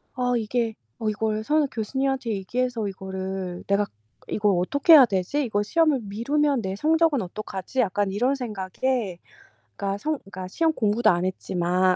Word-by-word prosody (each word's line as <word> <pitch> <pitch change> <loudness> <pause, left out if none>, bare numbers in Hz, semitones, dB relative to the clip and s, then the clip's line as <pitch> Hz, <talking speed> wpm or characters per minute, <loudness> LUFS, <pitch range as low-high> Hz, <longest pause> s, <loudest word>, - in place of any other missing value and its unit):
'어 250 -1 +1
이게 230 +1 -1 0.3
어 220 - 0
이걸 215 0 -1
선 300 +3 +2
교수님한테 265 +2 -2
얘기해서 225 +3 -2
이거를 190 -1 -5
내가 200 +1 +2 0.4
이걸 205 -2 +1
어떻게 285 - +4
해야 275 -5 +10
되지? 205 +8 -1
이걸 205 -3 0
시험을 305 +2 +2
미루면 275 +7 0
내 190 0 -3
성적은 315 +1 +2
어떡하지?' 195 +5 -5
약간 205 -1 0
이런 245 +7 +1
생각에 215 -3 -2 0.6
그러니까 200 0 -2
성 310 +6 -1
그러니까 185 -1 -8
시험 325 - +1
공부도 220 -2 +2
안 175 -1 +2
했지만 185 0 +1
215 Hz, 355 characters per minute, -25 LUFS, 190-260 Hz, 0.6 s, 해야